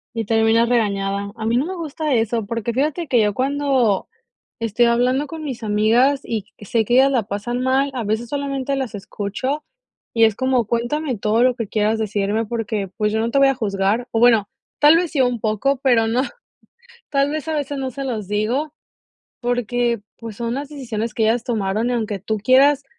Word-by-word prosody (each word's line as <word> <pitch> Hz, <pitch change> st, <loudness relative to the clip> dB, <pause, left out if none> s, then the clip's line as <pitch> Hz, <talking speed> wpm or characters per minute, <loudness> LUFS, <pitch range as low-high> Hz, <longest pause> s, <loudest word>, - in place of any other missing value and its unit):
Y 225 Hz, -1 st, -1 dB
terminas 225 Hz, +2 st, +3 dB
regañada. 200 Hz, -3 st, 0 dB
A 220 Hz, -, -6 dB
mí 230 Hz, +2 st, +2 dB
no 270 Hz, -, +1 dB
me 375 Hz, -, -4 dB
gusta 310 Hz, -3 st, -2 dB
eso, 225 Hz, -1 st, 0 dB
porque 230 Hz, +2 st, -3 dB
fíjate 300 Hz, +6 st, -1 dB
que 245 Hz, -3 st, +3 dB
yo 210 Hz, -1 st, +1 dB
cuando, 265 Hz, -6 st, +1 dB, 0.5 s
estoy 230 Hz, +1 st, +2 dB
hablando 250 Hz, +4 st, +2 dB
con 315 Hz, +2 st, -7 dB
mis 255 Hz, -5 st, -5 dB
amigas 225 Hz, +6 st, +3 dB
y 220 Hz, -3 st, -2 dB, 0.2 s
c -, -, -11 dB
sé 225 Hz, +2 st, +1 dB
que 240 Hz, -, 0 dB
ellas 265 Hz, +2 st, +6 dB
la 235 Hz, -5 st, +1 dB
pasan 225 Hz, +5 st, -3 dB
mal, 265 Hz, +2 st, +2 dB
a 240 Hz, -4 st, -3 dB
veces 220 Hz, +3 st, -2 dB
solamente 275 Hz, -1 st, -2 dB
las 260 Hz, -4 st, -3 dB
escucho 210 Hz, +8 st, -4 dB, 0.5 s
y 230 Hz, -1 st, +5 dB
es 220 Hz, -, +3 dB
como: 260 Hz, -1 st, +1 dB
"Cuéntame 245 Hz, +5 st, -1 dB
todo 215 Hz, +3 st, +2 dB
lo 255 Hz, -1 st, +4 dB
que 230 Hz, -5 st, -4 dB
quieras 215 Hz, +1 st, +1 dB
decirme 215 Hz, +1 st, -1 dB
porque, 215 Hz, -3 st, -3 dB
pues, 210 Hz, -1 st, 0 dB
yo 220 Hz, -, 0 dB
no 230 Hz, +1 st, 0 dB
te 275 Hz, -, +2 dB
voy 275 Hz, 0 st, +6 dB
a 270 Hz, -, +2 dB
juzgar". 205 Hz, +2 st, -1 dB
O 225 Hz, -, -1 dB
bueno, 225 Hz, -4 st, +5 dB, 0.3 s
tal 300 Hz, +2 st, +7 dB
vez 340 Hz, -1 st, 0 dB
sí 285 Hz, -, 0 dB
un 245 Hz, -2 st, +1 dB
poco, 220 Hz, +6 st, 0 dB
pero 235 Hz, -4 st, +3 dB
no, 240 Hz, +3 st, +1 dB, 0.9 s
tal 280 Hz, 0 st, +1 dB
vez 310 Hz, 0 st, -4 dB
a 315 Hz, -, -1 dB
veces 290 Hz, -1 st, -3 dB
no 265 Hz, -1 st, -2 dB
se 275 Hz, +3 st, -6 dB
los 225 Hz, -7 st, -3 dB
digo, 235 Hz, +9 st, -1 dB, 0.7 s
porque, 245 Hz, -1 st, 0 dB, 0.2 s
pues, 225 Hz, -3 st, -8 dB
son 235 Hz, 0 st, -2 dB
las 280 Hz, +1 st, -4 dB
decisiones 230 Hz, -6 st, -4 dB
que 220 Hz, -, +1 dB
ellas 230 Hz, +2 st, +1 dB
tomaron, 220 Hz, -1 st, -1 dB
y -, -, 0 dB
aunque 215 Hz, -4 st, -2 dB
tú 215 Hz, +3 st, -2 dB
quieras 270 Hz, +5 st, +4 dB
235 Hz, 205 wpm, -21 LUFS, 215-270 Hz, 0.9 s, tal